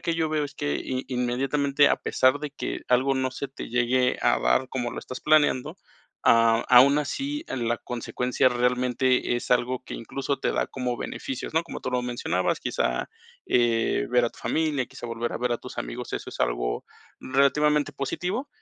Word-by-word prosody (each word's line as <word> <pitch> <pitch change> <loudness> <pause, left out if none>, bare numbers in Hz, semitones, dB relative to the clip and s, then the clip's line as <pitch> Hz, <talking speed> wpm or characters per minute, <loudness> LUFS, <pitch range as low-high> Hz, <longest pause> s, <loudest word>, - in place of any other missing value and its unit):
que 170 - -1
yo 165 -1 0
veo 155 -1 0
es 145 0 -8
que 75 - -2
i 130 0 -4
inmediatamente, 135 +3 +2
a - - +2
pesar 130 +2 +2
de 150 - -4
que 140 - -5
algo 130 +2 +3
no 130 -1 0
se 135 +2 -5
te 135 - -8
llegue 125 +1 +2
a - - +3
dar 60 - +2
como 125 -2 -3
lo - - -6
estás 130 - -7
planeando, 150 -4 +2 0.5
ah, 115 0 +5
aún 130 +3 +7
así 280 - -3
en 120 -3 -2
la 120 - +1
consecuencia, 125 +1 0
realmente 125 0 +1
es 120 - -6
algo 125 +1 +1
que - - -7
incluso 135 +4 -3
te - - 0
da - - 0
como 125 -2 -3
beneficios, 130 +2 -5
¿no? 160 - +3
Como 170 - -7
tú - - -4
lo 125 0 +1
mencionabas, 120 -7 -1
quizá, 60 - -1 0.4
eh, 120 -2 +2
ver 125 -1 +4
a 115 - 0
tu - - -19
familia, 145 +1 0
quizá, 120 - -9
volver 115 0 -3
a - - -3
ver 125 0 0
a 120 - -1
tus - - -10
amigos, - - -5
eso - - -5
es - - -9
algo - - -1 0.4
relativamente 145 +2 +2
positivo, 180 - -3
125 Hz, 195 wpm, -26 LUFS, 120-140 Hz, 0.5 s, aún